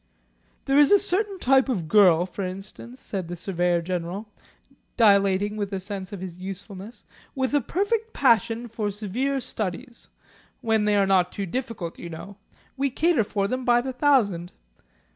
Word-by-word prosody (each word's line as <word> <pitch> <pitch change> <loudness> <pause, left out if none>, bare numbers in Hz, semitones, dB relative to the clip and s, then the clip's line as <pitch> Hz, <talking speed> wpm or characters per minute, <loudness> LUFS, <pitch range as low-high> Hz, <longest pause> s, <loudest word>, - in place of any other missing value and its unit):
"There 275 +1 +3
is 290 - +6
a 405 - +8
certain 405 0 -1
type 270 -4 +3
of 185 -11 -1
girl, 180 -3 +5
for 190 +2 -6
example," 195 +6 -8
said 195 -8 -5
the 175 - -5
Surveyor 175 -1 0
General, 180 +4 -4 0.7
dilating 200 -2 +3
with 205 -1 -3
a 195 - -1
sense 190 0 -6
of 200 -3 -7
his 180 -2 -7
usefulness, 195 +3 -8 0.3
"with 265 0 -1
a 290 - +3
perfect 420 - -1
passion 235 - +2
for 220 -2 -3
severe 225 +7 -2
studies 235 +2 -5 0.5
when 220 -3 +1
they 210 0 +3
are 200 -1 +4
not 185 -2 +2
too 200 - -4
difficult 210 -5 -5
you 170 - -7
know. 190 +5 -9 0.4
We 275 +1 0
cater 305 -1 +2
for 200 -1 -1
them 255 +4 -3
by 240 -1 +4
the 260 +2 -4
thousand. 225 - +2
210 Hz, 165 wpm, -25 LUFS, 190-260 Hz, 0.7 s, a